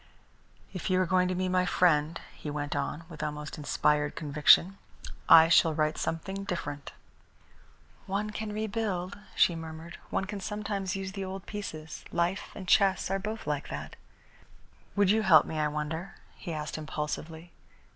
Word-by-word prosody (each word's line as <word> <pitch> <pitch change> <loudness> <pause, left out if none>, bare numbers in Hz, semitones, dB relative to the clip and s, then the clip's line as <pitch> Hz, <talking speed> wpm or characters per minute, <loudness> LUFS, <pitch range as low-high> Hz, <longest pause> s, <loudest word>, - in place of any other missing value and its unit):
"If 185 -1 -4
you 185 0 +3
are 185 - +3
going 180 +1 +2
to 185 - -1
be 185 +1 0
my 185 0 +2
friend," 165 -3 +2 0.2
he 150 - -7
went 145 0 -3
on, 165 - -2
with 160 -3 -9
almost 150 0 -5
inspired 150 0 +1
conviction, 155 +5 +4 0.5
"I 165 0 +10
shall 165 -1 +5
write 155 0 0
something 195 +4 -3
different." 145 -6 -5 1.2
"One 205 +2 -2
can 215 0 -4
rebuild," 210 -3 -3 0.2
she 170 - +4
murmured. 160 +1 -8
"One 195 - -1
can 205 +1 -5
sometimes 205 -1 -3
use 190 -1 -4
the 195 0 -5
old 190 0 -6
pieces. 160 -7 -7
Life 175 +3 -1
and 190 -3 -8
chess 195 -1 +3
are 195 - +1
both 215 +3 -5
like 145 -2 -2
that." 75 0 -6 1.0
"Would 200 -1 +4
you 220 +1 +3
help 180 -7 +6
me, 160 - -4
I 150 - +2
wonder?" 150 +5 -4 0.2
he 175 - -7
asked 155 0 -4
impulsively. 155 +2 -5
175 Hz, 160 wpm, -29 LUFS, 155-195 Hz, 1.2 s, I